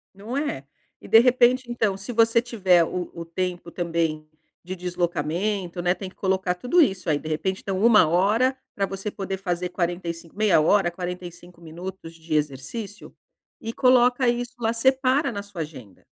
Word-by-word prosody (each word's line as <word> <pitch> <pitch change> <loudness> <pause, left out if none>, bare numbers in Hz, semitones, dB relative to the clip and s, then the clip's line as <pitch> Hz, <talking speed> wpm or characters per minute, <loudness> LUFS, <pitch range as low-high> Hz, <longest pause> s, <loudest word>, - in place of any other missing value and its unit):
Não 215 +6 -7
é? 285 - -3 0.4
E - - -12
de 225 - +8
repente, 250 0 +3
então, 220 -5 0
se 195 +5 -7
você 230 0 +4
tiver 190 -8 +3
o 180 +1 -5
o 170 -1 -7
tempo 175 0 -4
também 165 -3 -2 0.4
de 185 +2 -6
deslocamento, 175 +1 -2
né, 175 +1 +2
tem 190 -1 -7
que - - -22
colocar 190 -2 0
tudo 250 - +2
isso 190 - +1
aí, 150 -2 +2
de 155 - -7
repente, 185 +5 -2
então, 190 -1 -3
1 215 -8 +6
hora 210 +10 +2 0.2
pra 195 - 0
você 195 +2 -5
poder 195 -1 -4
fazer 180 -1 -3
45, 170 -1 -4
meia 210 -5 +4
hora, 175 +4 +3
45 175 -1 -8
minutos 170 +1 -9
de 160 -1 -7
exercício 150 - -4 0.5
e 225 - -4
coloca 250 0 +4
isso 240 +1 -1
lá, 225 -1 0
separa 265 +3 +2
na 200 -2 -5
sua 200 -5 -7
agenda. 130 - -10
190 Hz, 170 wpm, -24 LUFS, 170-225 Hz, 0.5 s, de